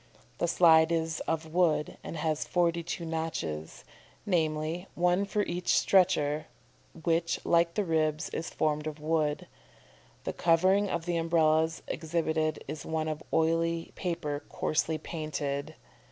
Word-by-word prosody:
The 170 - +1
slide 165 -1 +5
is 165 -1 0
of 160 -1 -2
wood, 160 -4 +2
and 165 - -6
has 155 -1 -1
forty 170 -1 +1
two 170 0 -5
notches, 160 - -4 0.4
namely, 160 -1 0
one 180 +3 +2
for 205 +1 0
each 175 -1 0
stretcher, 155 -5 +3 0.6
which 165 0 +1
like 170 0 +3
the 210 - +1
ribs, 155 -1 0
is 165 - -4
formed 150 0 -1
of 155 0 -5
wood. 155 -1 0 0.8
The - - -3
covering 185 +4 +3
of 170 -1 -2
the 175 -1 0
Umbrellas 160 -1 +2
exhibited 160 -1 -1
is 150 0 -5
of 155 -1 -2
oiled 165 +1 +1
paper 155 -5 -3
coarsely 160 +1 0
painted." 155 -2 -4
160 Hz, 130 wpm, -29 LUFS, 155-170 Hz, 0.8 s, slide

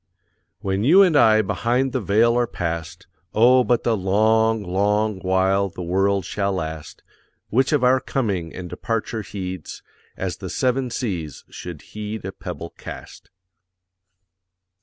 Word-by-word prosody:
When 95 +1 -1
you 180 +10 +7
and 175 -5 +3
I 110 -5 +5
behind 125 +6 0
the 130 - -1
Veil 110 +4 +3
are 120 -1 +2
past, 85 -1 -4 0.3
Oh 125 +3 +6
but 120 -1 +1
the 115 - +2
long, 110 +3 +2
long 105 +2 0
while 95 +1 +1
the 90 - -7
world 95 +2 +1
shall 100 0 -1
last, 80 -4 -6 0.5
Which 130 +4 +2
of 145 -4 +2
our 130 +1 +5
coming 100 - -2
and 90 -1 -7
departure 110 +5 -3
heeds, 95 -5 -7 0.3
As - - -3
the - - -7
seven 130 0 0
seas 90 - -4
should - - -8
heed 105 -1 -5
a 95 - -3
pebble 90 -3 -7
cast. - - -10
105 Hz, 140 wpm, -22 LUFS, 95-120 Hz, 0.5 s, you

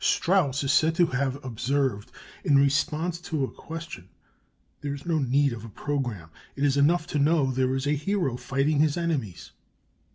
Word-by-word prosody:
Strauss 155 -7 +2
is 140 0 +1
said 160 +2 +3
to 175 - +4
have 135 -3 -1
observed, 130 -2 -1 0.3
in 140 - +3
response 150 +5 +1
to 155 -5 -2
a 130 - -2
question: 160 - -9 0.7
"There 145 -1 -3
is 140 - -11
no 165 -2 +1
need 140 0 +2
of 110 -2 -8
a 115 - -8
programme. 115 - -4 0.2
It 140 - -3
is 140 -1 +3
enough 160 +4 +3
to 150 - -2
know 145 -2 +3
there 130 0 0
is 135 +1 -2
a 145 - +1
hero 150 -2 0
fighting 135 +4 0
his 150 +1 +2
enemies." 145 - -3
140 Hz, 175 wpm, -26 LUFS, 130-160 Hz, 0.7 s, to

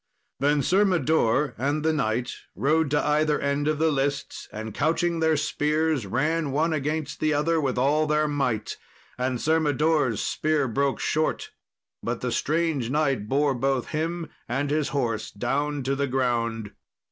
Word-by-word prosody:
Then 145 +1 +2
Sir 190 +9 +3
Mador 150 - +2
and 145 +4 0
the 160 - +3
knight 125 -4 -1 0.2
rode 155 +2 +2
to 150 +1 +1
either 150 0 +2
end 140 +1 0
of 155 -1 +1
the 160 +1 +2
lists, 140 0 -2
and 110 0 -6
couching 165 +4 0
their 160 -1 +3
spears, 150 -4 0
ran 150 +8 0
one 155 +4 +1
against 150 +1 -2
the 155 -1 +1
other 160 +2 +1
with 130 -4 -1
all 150 +4 +2
their 150 0 +2
might; 135 -7 -1 0.4
and 125 -1 -1
Sir 160 +4 +2
Mador's 150 -5 +1
spear 155 -3 0
broke 135 +3 0
short, 155 0 -1 0.5
but - - -3
the - - -2
strange 155 -6 0
knight 135 -7 0
bore 140 +1 +2
both 135 0 -1
him 165 +1 -2 0.2
and 140 +4 -1
his 150 -1 +1
horse 120 -7 -2
down 145 +6 -2
to 135 +2 0
the 140 +1 0
ground. 115 -4 -1
145 Hz, 160 wpm, -25 LUFS, 130-155 Hz, 0.5 s, Sir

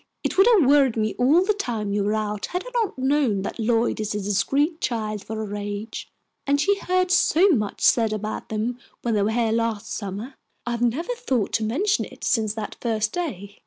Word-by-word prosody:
It - - -1
would 390 +3 +6
have 415 - +5
worried 275 -4 +4
me 215 -1 0
all 300 +9 +4
the 425 - +2
time 225 - -3
you 205 0 +1
were 210 +2 0
out 210 -1 -2
had 360 +4 -4
I - - -8
not 455 - -1
known 260 -7 +1
that - - -5
Lloyd 230 0 +1
is 215 -1 -2
a - - -1
discreet 275 - 0
child 215 -4 -2
for 220 - -6
her 215 -2 -4
age, 205 +2 -5 0.4
and 285 +1 +2
she 400 +6 +2
heard 365 -1 +1
so 365 +1 +4
much 215 - 0
said 225 -2 +4
about 215 0 -4
them 225 +3 -2 0.2
when 235 - 0
they 210 - +2
were 205 - +1
here 225 0 +1
last 230 -2 -1
summer. 205 +6 -5 0.3
I 240 - -2
have 235 0 -3
never 270 - 0
thought 270 - -1
to 220 - +1
mention 375 - +1
it - - -14
since 220 -5 +1
that 220 -2 -6
first 220 -2 0
day." 205 - -5
230 Hz, 215 wpm, -24 LUFS, 215-295 Hz, 0.4 s, would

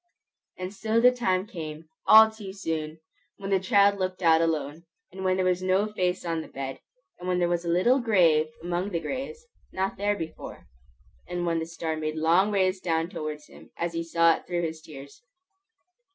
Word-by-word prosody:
And 185 +1 -5
so 220 +2 0
the 250 +2 +6
time 190 -7 0
came, 160 -5 -8 0.2
all 220 0 +9
too 210 -3 -9
soon! 160 -5 -4 0.4
when 195 -1 -6
the 190 - +3
child 200 0 +3
looked 185 0 -3
out 165 -1 +5
alone, 160 0 -2 0.3
and 190 +1 -8
when 185 0 +2
there 185 - +1
was 180 0 +1
no 185 +2 +2
face 185 -4 -2
on 165 -1 -1
the - - -10
bed; 135 -1 -6 0.4
and 180 - -7
when 180 -1 +1
there 175 -1 +2
was 175 0 -1
a - - -2
little 210 +10 +3
grave 175 -10 +3 0.2
among 175 +3 -2
the 170 -4 -2
graves, 270 - -6 0.3
not 190 +1 -2
there 205 +1 0
before; 165 -5 -8 0.6
and 175 0 -3
when 165 -1 0
the 160 - -4
star 165 -1 -4
made 155 0 -3
long 170 +6 +3
rays 190 -1 +1
down 165 -1 -1
towards 150 -1 -5
him, - - -16
as 170 0 -2
he 165 0 -2
saw 165 0 +4
it - - -17
through 175 -1 -1
his 160 -1 -4
tears. 140 -3 -12
175 Hz, 195 wpm, -26 LUFS, 165-195 Hz, 0.6 s, all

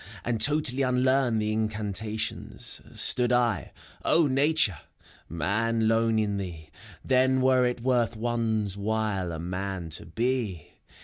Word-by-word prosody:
And 115 -2 -1
totally 145 0 +2
unlearn 130 -1 +2
the 105 0 0
incantations, 110 - -3
— - - -16
Stood 125 0 +2
L 120 - +2 0.4
(LNatu 150 -3 +3
re! 95 - -8 0.6
Man^ 110 +6 +1
lone 115 0 +2
in 105 -2 0
thee, 85 -5 -7 0.3
Then 130 0 +3
Vere 130 -1 +4
it 125 -1 -3
worth 125 -3 +1
one's 110 -3 -1
while 100 -3 -1
a 80 - -4
man 90 0 -4
to 80 - -4
be! 115 - -2
110 Hz, 130 wpm, -27 LUFS, 100-125 Hz, 0.6 s, Vere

